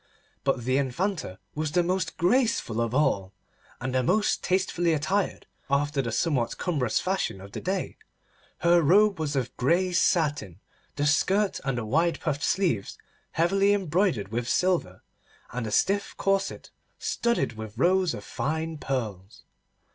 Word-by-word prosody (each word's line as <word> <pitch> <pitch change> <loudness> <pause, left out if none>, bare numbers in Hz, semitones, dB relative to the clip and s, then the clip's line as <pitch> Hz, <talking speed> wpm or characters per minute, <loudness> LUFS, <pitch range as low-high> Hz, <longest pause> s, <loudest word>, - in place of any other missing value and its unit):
But 135 -3 0
the 130 +1 +2
Infanta 140 - -2 0.2
was 150 -1 -3
the 175 0 +3
most 180 -1 -1
graceful 185 - +1
of 115 +1 -1
all, 100 -10 +1 0.5
and 130 0 -3
the 130 - +2
most 210 - +1
tastefully 180 -2 +1
attired, 190 +7 -1 0.2
after 140 0 +1
the 120 -3 -3
somewhat 125 -1 0
cumbrous 145 -10 0
fashion 190 - -1
of 100 +1 -11
the - - -6
day. 190 +1 -2 0.6
Her 170 0 +5
robe 195 +5 +4
was 150 -2 -2
of 130 -2 -2
grey 175 +8 +2
satin, 150 - +1 0.4
the 145 0 0
skirt 190 +7 +2
and 135 -3 -1
the 120 - -3
wide 165 +8 +1
puffed 145 -3 -2
sleeves 170 - 0 0.4
heavily 195 +4 +3
embroidered 175 - 0
with 115 +2 -3
silver, 175 - 0 0.5
and 125 -2 -3
the - - -4
stiff 200 - +1
corset 195 0 -1 0.3
studded 235 - 0
with 110 -1 -8
rows 180 -3 +2
of 105 - -8
fine 160 +4 -3
pearls. 110 -8 -4
155 Hz, 145 wpm, -27 LUFS, 125-185 Hz, 0.6 s, Her